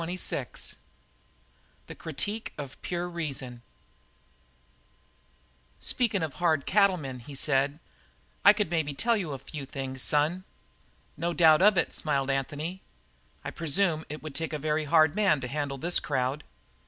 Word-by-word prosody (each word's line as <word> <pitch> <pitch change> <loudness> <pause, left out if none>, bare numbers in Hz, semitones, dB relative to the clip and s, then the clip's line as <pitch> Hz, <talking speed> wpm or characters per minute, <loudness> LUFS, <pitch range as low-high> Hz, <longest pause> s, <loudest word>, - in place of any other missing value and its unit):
CHAPTER 170 +2 -3
XXVI - - -4 1.1
"THE - - -9
CRITIQUE 215 +2 -4
OF 140 -3 -8
PURE 175 0 -2
REASON" 140 -8 -5 2.2
"Speakin' 215 -8 0
of 155 -4 -3
hard 160 -5 +1
cattlemen," 180 -11 +2
he 140 +4 -10
said, 140 +1 +1 0.7
"I 205 - +10
could 210 -5 -1
maybe 155 -4 0
tell 235 +9 +2
you 185 -8 -2
a - - -4
few 140 +2 -8
things, 135 -1 -4
son." 155 +7 +2 0.7
"No 170 +1 -1
doubt 160 -1 +6
of 205 0 +6
it," - - +1
smiled 140 -3 0
Anthony. 150 +7 -3 0.6
"I - - -3
presume 165 0 +1
it 150 +1 -7
would 155 -2 -6
take 160 +1 -3
a - - 0
very 155 +1 -1
hard 155 0 +5
man 200 -8 +3
to 125 - -3
handle 140 +1 -3
this 175 +6 +2
crowd." 135 +1 -1
155 Hz, 145 wpm, -28 LUFS, 140-175 Hz, 2.2 s, I